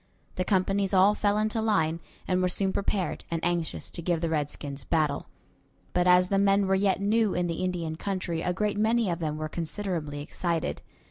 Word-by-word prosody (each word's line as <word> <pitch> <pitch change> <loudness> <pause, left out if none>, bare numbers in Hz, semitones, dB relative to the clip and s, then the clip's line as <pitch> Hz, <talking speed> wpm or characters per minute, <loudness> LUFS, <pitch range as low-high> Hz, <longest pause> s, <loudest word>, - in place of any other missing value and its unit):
The 185 - -1
companies 195 +1 +1
all 190 +2 +6
fell 205 0 +1
into 215 +1 0
line, 165 -7 +1 0.3
and 185 0 +1
were 180 - +2
soon 190 +1 +1
prepared 195 -3 -1
and 165 - -1
anxious 175 -2 -2
to - - -5
give 170 0 0
the 165 0 -1
redskins 145 -2 -3
battle; 150 -1 0 0.7
but 180 0 +2
as 180 0 +5
the 195 - +2
men 200 0 +4
were 190 - +1
yet 190 0 +2
new 215 +1 +2
in 180 0 +1
the 170 +1 -2
Indian 170 -3 -2
country 185 -3 -2
a 180 - 0
great 205 +2 -1
many 220 -2 +2
of 170 - -2
them 155 -2 -2
were 155 0 -3
considerably 165 -2 -3
excited. 170 +1 -2
180 Hz, 195 wpm, -27 LUFS, 165-200 Hz, 0.7 s, all